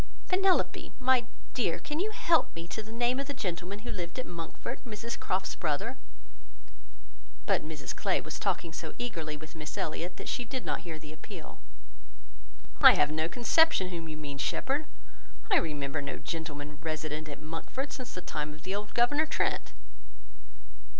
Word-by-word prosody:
Penelope, 380 0 +3
my 255 -2 +4 0.3
dear, - - +2
can 300 +1 -3
you 405 +4 +2
help 340 -6 +3
me 165 0 -5
to 220 - -3
the 220 +1 -10
name 240 +3 +2
of 275 - -2
the 285 - -3
gentleman 185 -4 -2
who 240 - -2
lived 175 -1 -3
at 255 - -1
Monkford: 175 +8 -5
Mrs 230 0 -4
Croft's 190 +1 0
brother?" 150 -4 0 1.5
But - - +3
Mrs 155 -3 -4
Clay - - +2
was - - -5
talking 165 -2 0
so - - -5
eagerly 165 -11 -3
with 155 +1 -10
Miss 155 -2 -5
Elliot, 170 +3 -2
that - - -6
she 250 - 0
did 250 +2 -4
not - - 0
hear 165 -3 -6
the 155 0 -9
appeal. 155 +1 -9 1.2
"I - - +12
have - - +4
no 155 +1 +1
conception 245 - +5
whom 170 -2 -4
you 155 - -4
can - - -7
mean, 145 -1 -4
Shepherd; 280 - +1 0.6
I - - +8
remember 145 -2 0
no 140 - -3
gentleman 145 -1 -4
resident 155 -1 -2
at 145 - -6
Monkford 165 - -4
since 255 -2 -6
the 180 - -3
time 150 -3 -3
of 155 +4 -13
old 205 +2 -2
Governor 290 +6 +4
Trent." - - 0
175 Hz, 170 wpm, -31 LUFS, 155-245 Hz, 1.5 s, I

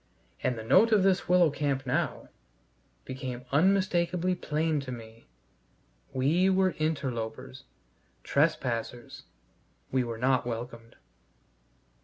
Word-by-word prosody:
And 125 - 0
the 110 - -6
note 200 - +5
of 210 -3 +4
this 190 -2 +2
willow 180 -3 +5
camp 140 -2 -2
now 130 - -2 0.8
became 130 -1 -6
unmistakably 180 +2 +2
plain 155 -2 -1
to 135 -2 -6
me: 115 - -10 0.8
we 155 +9 +2
were 190 0 +3
interlopers, 130 -4 -3 0.6
trespassers, 125 -5 -1 0.7
we 130 -1 +2
were 115 -1 -5
not 130 +1 +2
welcomed. 115 -1 -6
135 Hz, 105 wpm, -28 LUFS, 125-175 Hz, 0.8 s, note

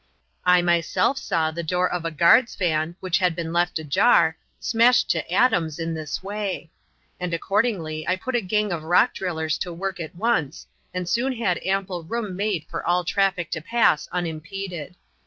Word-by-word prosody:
I 180 -1 +5
myself 175 - +1
saw 160 -1 0
the 170 +2 -4
door 180 +2 +1
of 175 -2 -3
a - - 0
guard's 170 - +4
van, 165 -2 0
which 180 -1 +1
had 180 -3 +1
been 165 0 -4
left 175 0 +1
ajar, 160 +1 +3 0.2
smashed 235 +2 +3
to - - -2
atoms 165 -11 +2
in 165 0 -3
this 155 +2 -5
way; 195 -4 -4 0.5
and 180 -2 -2
accordingly 165 -5 -1
I 185 - +2
put 255 +8 -5
a 240 - +2
gang 210 +1 0
of 170 -2 -2
rock 175 +9 +3
drillers 160 -4 -2
to 180 - -3
work 180 +2 -4
at 160 -1 -6
once 175 - -1 0.3
and 180 -1 -4
soon 255 +7 +1
had 210 -7 0
ample 190 -2 -1
room 210 +2 -4
made 195 -5 -1
for - - -5
all 175 +1 +1
traffic 190 -1 0
to 160 - -3
pass 225 -4 +2
unimpeded. 175 0 -5
180 Hz, 175 wpm, -24 LUFS, 165-195 Hz, 0.5 s, I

